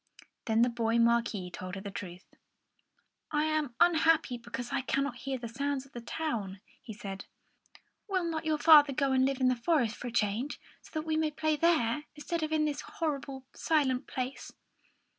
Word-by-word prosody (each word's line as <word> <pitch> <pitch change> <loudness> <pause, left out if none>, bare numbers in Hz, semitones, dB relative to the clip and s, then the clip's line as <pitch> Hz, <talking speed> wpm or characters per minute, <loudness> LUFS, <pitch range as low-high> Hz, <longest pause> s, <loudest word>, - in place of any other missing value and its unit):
Then 225 +1 +3
the 245 - +3
boy 230 -1 0
Marquis 230 -5 +2
told 185 +1 -6
her 195 - -6
the 200 0 -6
truth. 180 -2 -8 1.0
"I 300 -1 +1
am 310 -5 -1
unhappy 320 -7 +4
because 240 +1 -6
I - - 0
cannot 275 0 -1
hear 265 +2 -4
the 240 -1 -6
sounds 275 +3 -2
of 275 - -20
the 240 - -7
town," 225 -8 -3 0.2
he 260 -4 -9
said. 200 -2 -7 0.8
"Will 375 -2 +1
not 330 -1 -2
your 310 -1 +1
father 295 -2 +7
go 275 0 +1
and 260 0 +4
live 270 0 0
in 255 - +3
the 255 - +3
forest 240 -3 +1
for 245 - -7
a - - -4
change, 230 +5 -1 0.2
so - - -16
that 310 0 -2
we 315 -1 0
can 315 -1 +1
play 310 0 +1
there 335 +2 +4
together, 265 +7 -2
instead 325 +3 -3
of 310 0 -2
in 310 -1 +2
this 295 -1 -2
horrible, 275 -4 -4
silent 275 -6 +1
place?" 255 +1 -4
265 Hz, 195 wpm, -30 LUFS, 235-310 Hz, 1.0 s, father